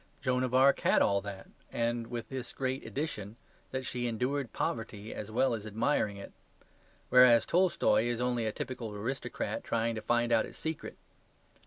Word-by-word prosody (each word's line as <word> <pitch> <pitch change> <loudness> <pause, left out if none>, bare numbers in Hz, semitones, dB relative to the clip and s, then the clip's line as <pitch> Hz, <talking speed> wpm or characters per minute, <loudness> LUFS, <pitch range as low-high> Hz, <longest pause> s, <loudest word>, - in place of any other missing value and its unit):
Joan 125 -2 +1
of 130 0 -1
Arc 135 +1 +5
had - - +4
all 100 0 +2
that 100 -1 -8 0.2
and 115 0 -1
with 120 -1 -5
this 130 -3 -5
great 130 0 -2
addition, 115 -8 -4 0.3
that 130 0 -4
she 125 -1 -2
endured 125 +3 -1
poverty 110 -2 -3
as 105 - -6
well 125 +3 +2
as 110 -1 -4
admiring 110 -1 0
it; 100 - -10 0.8
whereas 125 -2 +7
Tolstoy 175 -9 +3
is 120 -1 -1
only 120 -2 0
a - - 0
typical 120 -1 -5
aristocrat 115 +7 -3
trying 115 0 0
to 110 - -4
find 120 +2 +1
out 115 -1 +3
its - - -13
secret. 160 -1 -5
120 Hz, 170 wpm, -31 LUFS, 110-130 Hz, 0.8 s, whereas